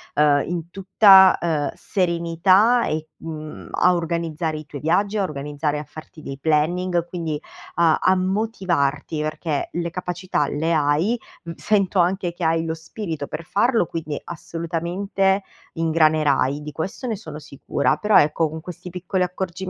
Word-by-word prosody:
uhm, 145 -1 +4
in 170 -1 -4
tutta, 190 0 +6
ehm, 155 -4 -1
serenità 185 +6 +2
e 155 0 -3
mhmm, 155 -1 -8
a 180 0 +3
organizzare 165 -2 -2
i 155 - -8
tuoi 145 -1 -8
viaggi, 200 +7 +1
a 200 - +1
organizzare 150 -1 -3
a - - -5
farti 155 +1 -12
dei 135 - -6
planning, 170 +4 +1
quindi 165 -4 -3 0.4
a 165 -1 +4
a 185 0 +3
motivarti 185 -7 -1
perché 155 -1 -2
le 170 0 -2
capacità 180 -3 -2
le 160 +4 -1
hai, 155 +10 +1 0.2
mhmm, 170 0 -7
sento 195 -3 +1
anche 180 0 +1
che 175 0 -7
hai 165 0 +2
lo 160 -1 -2
spirito 160 -2 -6
per 155 +2 -6
farlo, 225 +4 +2
quindi 155 -3 -5
assolutamente 175 +4 -2 0.3
ingranerai, 155 -4 +2
di 150 0 -7
questo 175 - -5
ne 225 - -1
sono 155 -7 -9
sicura. 145 +1 -1
Però, 210 +6 +4
ecco, 155 +2 +3
con 160 +1 -7
questi 180 +1 -9
piccoli 180 +1 -2
accorgimenti 180 -1 -4
170 Hz, 150 wpm, -22 LUFS, 155-185 Hz, 0.4 s, tutta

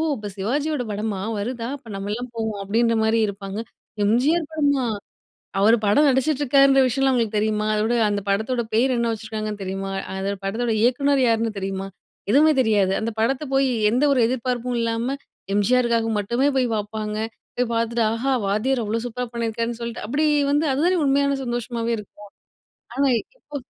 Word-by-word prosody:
இப்ப 210 -4 -6
சிவாஜியோட 280 +7 -1
படமா? 205 -1 -3 0.2
வருதா? 230 +2 -3
அப்ப 260 - -20
நம்மலாம் 210 +5 -4
போவோம்! 220 -2 -3
அப்டின்ற 230 +3 +1
மாரியும் 220 0 +2
இருப்பாங்க. 195 0 -6 0.5
எம்ஜிஆர் 285 +10 +2
படமா 285 -4 +1 0.7
அவரு 215 +4 +5
படம் 210 +9 +4
நடிச்சிட்டுருக்காருன்ற 275 0 +4
விஷயம்லாம். 270 +2 +2
அவுங்களுக்கு 225 -3 0
தெரியுமா? 215 0 0
அதோட, 215 +2 +1 0.2
அந்த 205 -1 -1
படத்தோட 220 +5 0
பேர் 255 +3 +3
என்ன 235 -1 0
வச்சுருக்காங்கன்னு 215 -2 -5
தெரியுமா? 195 +1 -4 0.2
அந்த 190 +1 -2
படத்தோட 225 +4 -1
இயக்குனர் 275 +3 +3
யாருன்னு 225 -1 +1
தெரியுமா? 195 0 -3 0.4
எதுவுமே 300 +6 +5
தெரியாது. 205 -5 +2
அந்த 225 +1 -2
படத்த 255 +5 +1
போயி 270 -1 +3 0.2
எந்த 245 +5 +1
ஒரு 265 - +3
எதிர்பார்ப்பும் 250 0 -2
இல்லாம, 230 +1 -1 0.5
எம்ஜிஆருக்காக 230 +2 +2
மட்டுமே 235 +7 +1
போய் 255 -1 +3
பாப்பாங்க. 210 0 -4 0.4
போய் 245 -1 0
பாத்துட்டு 230 0 +1
ஆஹா! 250 +4 -1
வாத்தியார் 235 +6 0
அவ்ளோ 220 +2 -1
சூப்பரா 250 +1 -4
பண்ணிருக்காருன்னு 230 0 -2
சொல்ட்டு 235 -2 -5
அப்படி 285 +7 +1 0.2
வந்து 295 +2 +2
அது 270 +3 0
தானே 365 0 +3
உண்மையான 280 0 +2
சந்தோஷமாவே 240 -1 -2
இருக்கும். 205 0 -12 0.7
ஆனா, 280 +1 +2 0.3
இப்போ 295 -10 -9
230 Hz, 150 wpm, -23 LUFS, 215-260 Hz, 0.7 s, அவரு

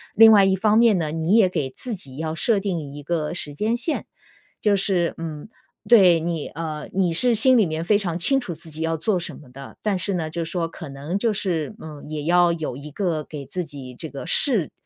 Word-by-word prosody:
另 225 +1 +8
外 200 -2 +7
一 190 0 +3
方 215 +3 +3
面 225 -5 +4
呢， 155 -3 -2
你 165 +6 0
也 215 -5 +5
给 140 -7 -2
自 235 - -4
己 140 -8 -8
要 160 0 -3
设 205 +5 +2
定 190 -4 -2 0.2
一 145 - -9
个 160 +1 -2
时 145 -4 -3
间 220 +9 -1
线。 300 +6 -2 0.5
就 210 -1 +3
是， 190 -3 +1
嗯， 160 +1 -6 0.4
对， 185 -8 +6
你 165 -2 -3
呃， 155 -1 -6
你 185 -3 0
是 240 +7 +4
心 255 +4 +6
里 215 -7 +4
面 160 +1 -4
非 205 +2 +3
常 175 -4 -3
清 270 +10 +2
楚 185 -10 -6
自 160 0 -14
己 155 +2 -7
要 165 0 -1
做 185 +3 0
什 175 - -6
么 145 - -15
的， 135 +1 -12
但 210 -2 0
是 190 +1 -1
呢， 165 -3 -2
就 170 0 -3
说 165 0 -2
可 160 -2 -10
能 145 +8 -4
就 230 0 +1
是， 190 -2 -2
嗯， 150 -2 -10
也 150 -1 -4
要 175 +1 +3
有 160 -6 -4
一 140 +3 -9
个 160 -1 -2
给 145 -3 -9
自 180 +7 -4
己 140 -5 -8
这 155 +5 -7
个 140 - -8
试 230 - +3
170 Hz, 250 characters per minute, -22 LUFS, 155-200 Hz, 0.5 s, 另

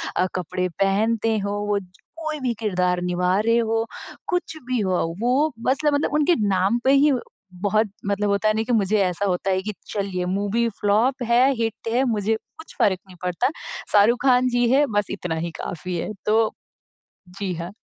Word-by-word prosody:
अ, - - +2
कपड़े 185 +1 -2
पहनते 220 +3 +2
हो, 200 0 -2 0.2
वो 205 -1 +1
ज 190 - -14 0.3
कोई 310 -2 -3
भी 255 -3 -1
किरदार 180 -4 0
निभा 180 +1 +1
रहे 230 +1 +4
हो, 225 -1 +1 0.4
कुछ 355 -2 -2
भी 255 -1 0
हो 185 -2 +1 0.2
वो 260 +7 +2
बस 260 +2 +3
ल 295 - +5
मतलब 285 0 0
उनके 300 +3 +3
नाम 195 +5 +2
पे 265 - +5
ही 285 +2 +5 0.5
बहुत 215 +1 +1
मतलब 205 +1 0
होता 200 +2 +2
नहीं 220 +1 -1
कि 245 - -2
मुझे 200 +2 +1
ऐसा 180 +2 -1
होता 190 0 0
है 190 0 +1
कि, 210 +2 -4
चलिए 195 -3 -2
मूवी 205 +5 0
फ्लॉप 230 +6 +2
है, 245 +3 +4
हिट 225 -1 -3
है, 250 +3 +2
मुझे 220 -2 +1 0.2
कुछ 320 - -12
फ़र्क 190 -3 +3
नहीं 185 -1 -14
पड़ता। 180 +5 0 0.4
शाहरुख 215 +4 +4
खान 255 -1 +4
जी 245 -1 +2
है 280 +3 +5
बस 205 - +1
इतना 180 -4 -3
ही 170 +1 -3
काफ़ी 180 +2 -5
है। 190 - -3
तो, 220 +1 +3 0.8
जी 190 0 -4
हाँ। 170 +3 -6
210 Hz, 190 wpm, -23 LUFS, 190-240 Hz, 0.8 s, ल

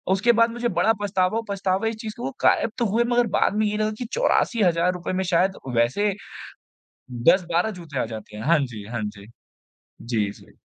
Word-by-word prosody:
उसके 235 +5 +3
बाद 230 0 +4
मुझे 240 0 -2
बड़ा 225 +4 +4
पछतावा 190 +1 +1
और 230 - -2
पछतावा 195 +1 0
इस 225 - -2
चीज़ 215 -1 -5
का - - -8
हुआ 255 - -2
वो 270 - -7
गायब 225 - +3
तो 240 - +1
हुए, 225 +4 +2
मगर 240 0 +2
बाद 205 - +2
में 215 0 +2
ये 210 0 -1
लगा 215 0 0
कि 245 - -4
₹84,000 180 - +1
में 190 +1 0
शायद 185 +2 +1 0.2
वैसे, 190 - +2 1.0
10-12 170 - +2
जूते 150 -6 -6
आ - - 0
जाते 110 -2 -9
हैं, 105 - -6
हाँ 165 0 +4
जी, 115 -7 -5
हाँ 120 -1 -4
जी, 105 -1 -7 0.7
जी, 110 -4 -1
जी। - - -17
190 Hz, 200 wpm, -24 LUFS, 140-220 Hz, 1.0 s, बाद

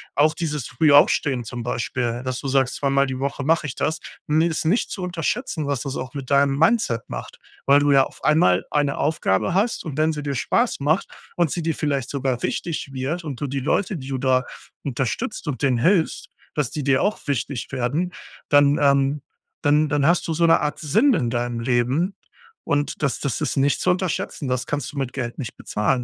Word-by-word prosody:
auch 155 +2 +3
dieses 150 -5 -3
frühe 155 -3 +4
Aufstehen 140 -3 +4
zum 120 +1 -6
Beispiel, 120 0 -2
dass 130 -1 -3
du 140 - -5
sagst, 135 -1 +1
zweimal 140 0 +2
die 130 -1 -4
Woche 140 +1 -2
mache 160 +1 +2
ich 130 - -4
das, 155 0 -1 0.3
ni 155 +2 +3
ist 165 -1 -2
nicht 190 +9 +1
zu 190 - -5
unterschätzen, 175 - -2
was 140 -3 -1
das 140 -2 -4
auch 130 +2 -6
mit 140 -3 -6
deinem 140 0 +3
Mindset 165 - +2
macht. - - -7 0.3
Weil 140 +1 +6
du 145 0 +2
ja 135 -1 +6
auf - - -14
einmal 95 - +3
eine 145 -2 +1
Aufgabe 145 - +1
hast 220 +4 +1
und 150 -3 -5
wenn 155 +1 +2
sie 150 - -4
dir 140 -1 -2
Spaß 235 - +1
macht 155 +6 +1 0.3
und 170 -3 +2
sie 170 - -2
dir 165 0 0
vielleicht 140 -4 -1
sogar 130 -3 -2
wichtig 160 -5 -3
wird 140 +7 -3
und 140 -4 -6
du 145 - -1
die 135 0 -3
Leute, 185 +6 0
die 135 -2 -8
du 135 - -2
da 130 0 +2 0.4
unterstützt 135 - -3
und 145 -1 -3
denen 130 -4 +2
hilfst, 170 +5 +1 0.3
dass 150 -6 0
die 150 - -4
dir 135 -1 +3
auch 210 - 0
wichtig 140 -2 -2
werden, 145 +9 -1 0.4
dann, 145 0 +5
ähm 140 0 +3 0.4
dann 150 0 +3
dann 145 -1 +1
hast 170 +1 +2
du 165 - -1
so 170 +2 +2
'ne 165 - +5
Art 150 - -1
Sinn 220 - +3
in 120 - 0
deinem 120 -1 -2
Leben 130 - +1 0.5
und 145 -2 -1
das 140 - 0
das 135 -6 -2
ist - - -1
nicht 135 +1 +2
zu - - +1
unterschätzen. 180 -5 -1
Das 125 -1 -1
kannst 145 -3 -3
du - - -9
mit 130 -2 -3
Geld 120 -3 -4
nicht 125 -6 -6
bezahlen, 105 +4 0
140 Hz, 210 wpm, -22 LUFS, 130-160 Hz, 0.5 s, Weil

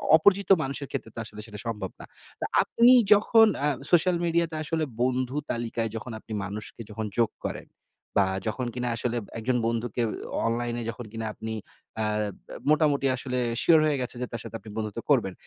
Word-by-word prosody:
অপরিচিত 200 +5 +4
মানুষের 135 +1 -4
ক্ষেত্রে 110 - -4
তো - - -5
আসলে 105 -1 -9
সেটা 105 -3 -8
সম্ভব 105 -4 -3
না। - - -9 0.3
তো - - -2 0.2
আপনি 235 +2 +5 0.2
যখন 225 +2 +6 0.2
আ - - +4 0.2
সোশ্যাল 175 +1 +5
মিডিয়া 170 0 +2
তে 155 - -5
আসলে 160 +1 -1 0.2
বন্ধু 130 +1 0 0.2
তালিকায় 115 -1 -2
যখন 115 +2 -5
আপনি 110 - -9
মানুষকে 105 +3 -7
যখন 110 +1 -4
যোগ 115 -2 +4 0.2
করেন। - - -4 0.5
বা 100 - +6 0.2
যখন 125 +3 -1
কিনা 125 -1 -2
আসলে 120 +1 -1 0.2
একজন 125 +2 +1
বন্ধুকে 115 0 -1 0.5
অনলাইনে 120 +1 -1
যখন 115 +1 -6
কিনা 115 0 -4
আপনি 110 0 -5 0.4
অ্যা 110 -1 +1 0.4
ব্যা - - -9
মোটামুটি 150 -3 +3
আসলে 125 0 -3 0.2
শিওর 165 -2 +6
হয়ে 145 -3 +1
গেছে 125 - -3
যে - - 0
তার 115 - -3
সাথে - - -8
আপনি 105 - -12
বন্ধুত্ব 110 0 -3
করবেন, 110 -9 +3
120 Hz, 180 wpm, -27 LUFS, 110-145 Hz, 0.5 s, যখন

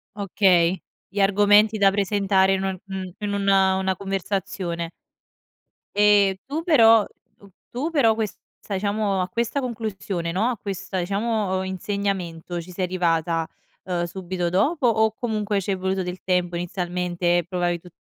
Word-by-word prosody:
Okay. 190 -3 +2 0.3
Gli 205 - -5
argomenti 205 +2 +4
da 200 -1 +5
presentare 195 -1 +2
in 190 - -1
u 190 -1 -2
mhmm, 190 -2 -6
in 205 -1 -3
una 195 -1 +3
una 190 0 0
conversazione. 190 -3 -3 1.1
Ehm, 205 -2 +5
tu 300 +4 -3
però 230 - +6 0.3
tu 200 - -17 0.2
tu 270 +7 -3
però 240 -9 +3
questa 220 -2 -3 0.3
diciamo, 200 0 0
a 180 - -1
questa 235 +7 -1
conclusione, 210 -8 -4
no, 195 +7 +1
a 250 -2 -1
questa 195 -1 -4
diciamo 200 0 -1
insegnamento, 190 -3 -3
ci 175 +2 -12
sei 180 +1 -2
arrivata, 165 -2 0 0.4
uhm, 175 -2 -2
subito 180 0 -4
dopo 260 - +2
o 220 -1 +3
comunque 215 -3 -1
c'è 195 0 -1
voluto 190 +1 -1
del 180 +1 -6
tempo 180 -1 0
inizialmente, 175 0 -1
e - - -2
provavi 175 -1 -1
tu 180 - -16
195 Hz, 145 wpm, -23 LUFS, 180-210 Hz, 1.1 s, però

